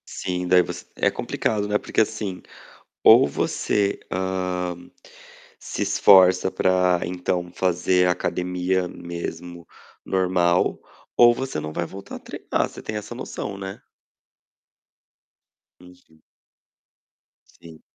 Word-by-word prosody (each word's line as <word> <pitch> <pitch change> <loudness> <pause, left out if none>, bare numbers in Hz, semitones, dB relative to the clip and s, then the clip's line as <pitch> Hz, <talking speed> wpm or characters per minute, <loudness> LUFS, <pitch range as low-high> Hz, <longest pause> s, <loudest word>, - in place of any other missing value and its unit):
Sim, 90 -1 -4
daí 90 0 +6
você 85 - -6
é - - +2
complicado, 105 -2 -2
né. 105 0 +2
Porque - - 0
assim, 105 -4 -3 0.6
ou - - +8
você, 100 +7 -1
hã, 90 -1 -2 0.8
se - - -6
esforça 95 -1 +5
para 90 -1 +2
então 90 0 -3
fazer 90 0 +2
academia 90 +1 -1
mesmo 85 0 -7 0.4
normal, 90 -2 +1 0.4
ou 120 0 +7
você 130 -7 -4
não 75 0 -6
vai 85 - -2
voltar 95 +3 -9
a - - -13
treinar, - - -3
você - - -11
tem 110 - -6
essa 105 +3 -7
noção, 100 -5 -6
né. 95 0 -8 2.0
Uhum. 90 -3 -19 1.3
Sim. 80 -2 -16
90 Hz, 110 wpm, -23 LUFS, 90-95 Hz, 2.0 s, ou